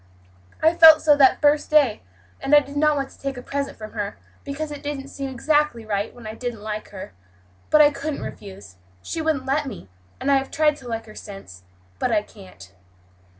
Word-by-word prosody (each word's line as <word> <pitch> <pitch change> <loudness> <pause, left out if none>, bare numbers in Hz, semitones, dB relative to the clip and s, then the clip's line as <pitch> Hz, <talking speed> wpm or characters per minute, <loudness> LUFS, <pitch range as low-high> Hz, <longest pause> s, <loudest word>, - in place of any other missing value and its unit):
I 320 +1 +5
felt 320 -2 +8
so 295 -2 +6
that 270 -2 +5
very 295 0 +6
first - - -13
day, 290 -8 +3 0.4
and 285 +2 +3
I - - +9
did 280 0 -9
not 300 +1 +3
want 275 -1 -3
to - - -19
take 275 -1 -4
a 250 - -8
present 280 +1 -4
from 215 -1 -9
her, 205 -2 -4 0.3
because 295 +2 -5
it 290 - -7
didn't 280 -2 -5
seem 275 -1 -5
exactly 295 -2 0
right 205 0 -2
when 240 -2 -14
I 215 - -6
didn't 230 -2 -6
like 215 0 -5
her, 190 - -9 0.6
but 305 - +6
I 295 0 +6
couldn't 295 +1 -5
refuse 100 - -10 0.3
she 325 - -4
wouldn't 310 -4 -1
let 280 +2 0
me 205 - -9 0.3
and 280 - 0
I 275 - +5
have 270 0 -3
tried 300 -1 +2
to 255 - -12
like 225 -1 -4
her 215 - -13
since, 195 - -11 0.4
but - - 0
I - - +2
can't." 95 0 -15
270 Hz, 215 wpm, -23 LUFS, 215-295 Hz, 0.6 s, I